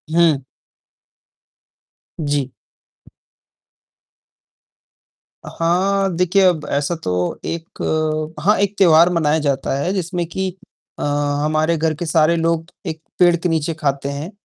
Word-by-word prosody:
हुँ। 160 -5 +4 1.8
जी। 145 -4 -1 3.0
हाँ, 195 +4 +1
देखिए 180 +3 +2
अब 165 -5 +2
ऐसा 145 +4 0
तो 90 -1 -1
एक 165 0 -6 0.6
हाँ, 200 +8 +3
एक 200 0 0
त्योहार 170 -2 +6
मनाया 160 -1 +2
जाता 140 -2 -1
है 180 +7 -1
जिसमें 175 -2 -2
कि 190 +2 -2 0.5
अ, - - -3
हमारे 145 +3 0
घर 160 0 0
के 175 - -5
सारे 160 +1 +3
लोग 165 0 0 0.2
एक 160 0 -5 0.2
पेड़ 175 -1 +6
के 175 +1 -2
नीचे 160 0 0
खाते 140 -2 -2
हैं 145 +7 -5
160 Hz, 115 wpm, -19 LUFS, 145-175 Hz, 3.0 s, त्योहार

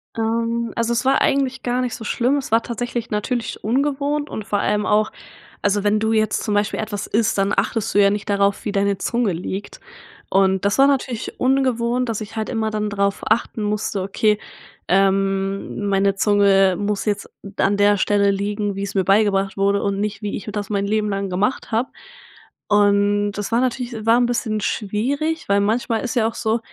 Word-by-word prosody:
Ähm, 230 +1 -1
also 230 0 0
es 250 +2 -1
war 270 0 +3
eigentlich 270 -2 +1
gar 245 +1 0
nicht 250 -2 -2
so 225 - -9
schlimm, 250 +6 +1
es 270 - -5
war 225 +1 +3
tatsächlich 240 0 -4
natürlich 225 +3 -3
ungewohnt 285 +5 0
und 215 - -6
vor 205 - 0
allem 210 0 0
auch 215 +1 +2 0.5
also 205 0 +1
wenn 210 +1 +2
du 220 +1 0
jetzt 215 -1 +1
zum 210 - -1
Beispiel 205 0 0
etwas 205 -2 -4
isst, 220 0 +1
dann 195 0 +1
achtest 215 +2 -1
du 205 - +3
ja 200 0 +5
nicht 205 0 -4
darauf, 200 0 +1
wie 210 - -2
deine 200 -1 0
Zunge 235 -5 0
liegt. 185 +4 -6 0.5
Und 190 0 +2
das 200 +1 +2
war 275 - +6
natürlich 260 -4 -2
ungewohnt, 250 -2 +1
dass 220 -2 -2
ich 215 +1 -8
halt 220 -1 -3
immer 220 -1 -1
dann 210 -1 -2
drauf 200 0 -1
achten 220 0 0
musste: 210 -2 -2
„Okay, 210 +2 +1 0.5
ähm, 195 +1 0
meine 195 0 +2
Zunge 195 -2 +4
muss 205 +1 -2
jetzt 205 -1 -2 0.3
an 200 - +2
der 205 0 +4
Stelle 200 +1 +2
liegen, 205 +1 -2
wie's 195 0 -4
mir 190 -2 +1
beigebracht 195 0 +2
wurde 200 +1 +2
und 200 -1 -1
nicht, 210 0 -3
wie 205 -1 -3
ich - - -9
das 205 -1 -4
mein 200 -1 0
Leben 210 0 0
lang 195 0 -2
gemacht 200 +9 -1
habe.“ 230 +4 0 0.8
Und 205 0 +3
das 205 +1 -5
war 230 - +3
natürlich 240 -3 -3
war 230 +1 +5
'n 245 - +2
bisschen 220 -3 -1
schwierig, 275 - -2
weil 200 - +4
manchmal 225 +2 0
ist 245 - -3
ja 225 -3 +3
auch 230 - -5
so 220 +1 0
210 Hz, 195 wpm, -21 LUFS, 200-235 Hz, 0.8 s, war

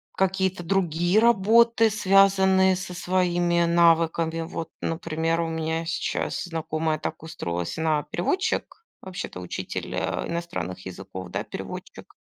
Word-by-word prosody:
какие-то 190 -1 0
другие 175 +1 +2
работы, 230 +1 +5
связанные 190 -2 +4
со 180 -1 -6
своими 175 -1 +1
навыками. 165 -1 +3
Вот, 165 0 -5
например, 165 0 -1
у 165 - -1
меня 160 0 -2
сейчас 175 +3 -2
знакомая 155 -2 -2
так 160 - -5
устроилась. 85 - -4
Она- 155 -2 +1
переводчик, 375 - -1 0.2
вообще-то 185 - -6
учитель, 90 - -5
э, - - -2
иностранных 170 - -4
языков, 95 0 -8
да, - - -3
переводчик. - - -8
170 Hz, 115 wpm, -25 LUFS, 160-190 Hz, 0.2 s, работы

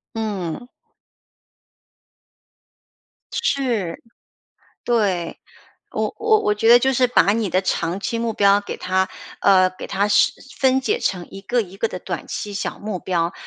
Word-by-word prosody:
嗯。 215 0 -4 2.6
是， 255 - -1 0.8
对。 195 -8 0 0.5
我 - - -2
我 440 -1 +4
我 210 - +2
觉 225 +2 +1
得 240 - +10
就 265 +2 +1
是 250 0 +3
把 220 -4 +4
你 220 -4 -1
的 185 +2 +1
长 175 0 -1
期 230 +2 -2
目 230 -1 -1
标 200 -1 +4
给 - - -6
它 185 0 0 0.3
呃， 185 -2 +5
给 185 - -9
它 200 +1 0
实 205 0 +4 0.3
分 265 -1 +4
解 430 - 0
成 180 -2 -2
一 195 - -9
个 240 +4 0
一 190 -1 -10
个 225 - 0
的 185 - -6
短 180 -2 -6
期 205 - -5
小 200 - -3
目 205 -3 -5
标。 175 -1 -1
205 Hz, 160 characters per minute, -21 LUFS, 185-235 Hz, 2.6 s, 得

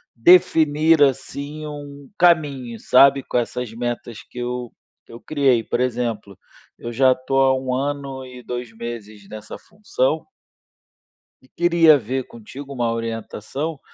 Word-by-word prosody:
definir, 160 +1 +4
assim, 145 +2 0
um 145 -1 -9
caminho, 140 -9 +2
sabe, 135 +1 +5
com - - -9
essas 120 -1 -4
metas 120 -1 -5
que - - -15
eu 125 -1 -4 0.3
que - - -17
eu 115 - -10
criei. 135 -6 +2
Por 125 - -1
exemplo, 115 -5 -3 0.4
eu 120 0 -6
já 130 +1 +4
tô 130 +1 -4
há 135 0 +4
1 130 -1 -3
ano 135 -1 -3
e 125 -1 -11
2 120 -1 -6
meses 110 -3 -8
nessa 110 0 -9
função 400 - -2 1.2
e - - -23
queria 170 -3 +4
ver 130 +1 -3
contigo 135 +5 -10
uma 120 -3 -1
orientação, 115 +6 -5
130 Hz, 140 wpm, -21 LUFS, 120-145 Hz, 1.2 s, sabe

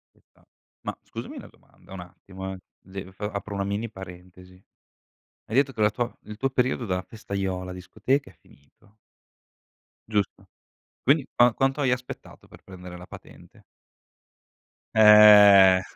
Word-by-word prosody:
Ci - - -30
sta. - - -32 0.4
Ma - - -4
scusami - - -9
una - - -10
domanda. - - -20
Un 95 - -8
attimo, 95 +2 -10
eh. 95 - -10 0.3
De 95 0 -9
f 95 - -29
apro 105 0 -5
una 100 - -2
mini 100 +4 -3
parentesi. 90 -1 -13 0.9
Hai 110 - -5
detto 135 0 +2
che 110 - -5
la 105 - +4
tua 120 +3 -4
il 105 0 -10
tuo 135 +4 -1
periodo 130 -1 -1
della 90 -3 -2
festaiola 95 -3 -5
discoteca 130 +8 -2
è - - -27
finito 95 +5 -26 1.1
Giusto, 105 -3 -3 0.6
quindi 140 +1 +2
qua 120 -1 +4
quanto 135 +4 0
hai 130 -3 +1
aspettato 125 0 -7
per - - -18
prendere 90 -1 -11
la 90 - -12
patente? - - -15 1.3
Eh! 105 -3 +8
100 Hz, 145 wpm, -25 LUFS, 95-115 Hz, 1.3 s, Eh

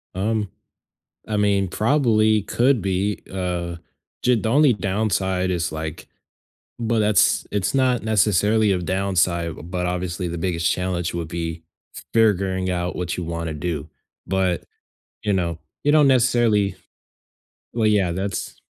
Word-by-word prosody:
Um, 105 +1 -1 0.8
I 105 -1 -1
mean, 100 -2 +2
probably, 110 -1 +2
could 125 +3 +2
be, 95 +2 -1
uh, 90 -2 -3 0.5
ju 125 0 +4
The 110 0 -1
only 140 +1 +5
downside 95 -2 0
is, 85 -1 -1
like 80 0 -6 0.7
but 115 -1 0
that's 105 -1 +3
it's 100 -2 0
not 130 -4 +2
necessarily 105 0 +3
a 90 - 0
downside, 85 -3 -1
but, 90 0 -1
obviously, 90 0 -2
the 85 0 -4
biggest 85 -1 0
challenge 90 -2 -1
would 85 -2 -4
be 85 -1 -4 0.3
f - - -8
figuring 95 -4 +2
out 90 -1 -2
what 90 -1 -2
you 90 - -4
wanna 85 -1 -4
do. 75 -1 -4 0.4
But, 95 -2 0 0.6
you 105 - +1
know, 85 -3 -1 0.2
you 145 - +3
don't 150 -2 +5
necessarily 120 -5 +3 1.0
Well, 115 -2 +2
yeah, 100 -4 +2
that's 95 +2 -4
95 Hz, 135 wpm, -22 LUFS, 85-110 Hz, 1.0 s, only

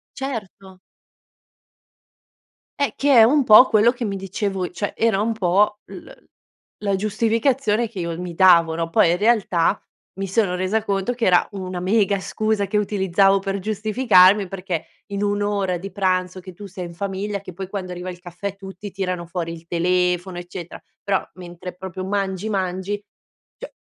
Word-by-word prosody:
Certo. 200 -8 -7 2.0
Eh, 280 - +1
che 285 0 +2
è 225 - +9
un 280 +6 +4
po' 245 +1 +8
quello 220 +2 +4
che 240 -1 -5
mi 200 -3 -2
dicevo 195 -1 -3
cioè 200 +3 -4
era 225 -4 +2
un 225 +2 0
po' 205 +1 +1
l - - -11 0.7
la 200 -1 0
giustificazione 230 +3 +1
che 210 - -10
io 170 -2 -3
mi 180 -1 -6
davo, 170 -3 +5
no, 165 0 -2
poi 165 0 +4
in 175 - +2
realtà 200 -4 +2 0.4
mi 195 - -2
sono 195 -2 +1
resa 185 +4 -1
conto 200 +3 -1
che 240 -1 -2
era 180 -3 +4
una 185 -2 -5
mega 200 +1 +1
scusa 215 +1 -1
che 210 +2 +1
utilizzavo 195 -1 +2
per 195 0 -3
giustificarmi 210 -1 +4
perché 180 -3 -4 0.2
in 200 0 -3
1 205 0 0
ora 200 -3 0
di 195 +3 -7
pranzo 185 -2 -1
che 185 0 -10
tu 200 +3 -10
sei 190 -1 -7
in 170 - -10
famiglia 200 +2 -3
che 185 - -10
poi 190 +2 -7
quando 190 -2 -5
arriva 180 +1 -5
il 175 -1 -10
caffè 180 +2 -6
tutti 195 0 -9
tirano 185 -3 -3
fuori 170 -1 -4
il 165 0 -13
telefono, 180 +1 0
eccetera. 175 -1 -8 0.2
Però 195 -1 +1
mentre 180 0 -9
proprio 185 0 -7
mangi, 195 0 -2
mangi, 195 +1 -2 0.5
cioè, - - -9
195 Hz, 170 wpm, -22 LUFS, 180-210 Hz, 2.0 s, è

